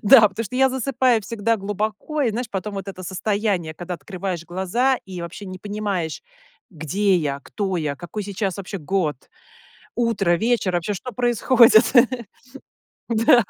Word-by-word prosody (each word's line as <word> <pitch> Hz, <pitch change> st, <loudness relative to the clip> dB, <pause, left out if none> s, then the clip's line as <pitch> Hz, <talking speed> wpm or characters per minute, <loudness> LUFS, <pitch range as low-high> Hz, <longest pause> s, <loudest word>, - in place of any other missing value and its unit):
Да, 215 Hz, -1 st, +8 dB
потому 215 Hz, +4 st, -4 dB
что 250 Hz, +5 st, -6 dB
я 265 Hz, 0 st, +5 dB
засыпаю 255 Hz, -2 st, +2 dB
всегда 230 Hz, +1 st, -1 dB
глубоко 210 Hz, +9 st, -2 dB
и, 240 Hz, -, +2 dB
знаешь, 240 Hz, +3 st, -3 dB
потом 200 Hz, +1 st, -4 dB
вот 195 Hz, 0 st, -5 dB
это 185 Hz, -1 st, -7 dB
состояние, 190 Hz, -3 st, -1 dB
когда 175 Hz, +2 st, -5 dB
открываешь 180 Hz, 0 st, -5 dB
глаза 190 Hz, +9 st, +1 dB
и 185 Hz, -2 st, -7 dB
вообще 170 Hz, +4 st, -7 dB
не 185 Hz, 0 st, -7 dB
понимаешь, 200 Hz, -5 st, -3 dB, 0.5 s
где 185 Hz, +5 st, 0 dB
я, 140 Hz, -4 st, -2 dB
кто 195 Hz, -3 st, -3 dB
я, 150 Hz, -3 st, -1 dB
какой 175 Hz, +6 st, -6 dB
сейчас 195 Hz, -2 st, -3 dB
вообще 195 Hz, 0 st, -6 dB
год, 155 Hz, -2 st, -1 dB, 0.8 s
утро, 225 Hz, -7 st, +1 dB
вечер, 220 Hz, -1 st, +1 dB
вообще, 175 Hz, +4 st, -1 dB
что 250 Hz, +6 st, -7 dB
происходит. 240 Hz, 0 st, +5 dB, 1.3 s
Да. 230 Hz, +1 st, +5 dB
200 Hz, 150 wpm, -22 LUFS, 180-230 Hz, 1.3 s, Да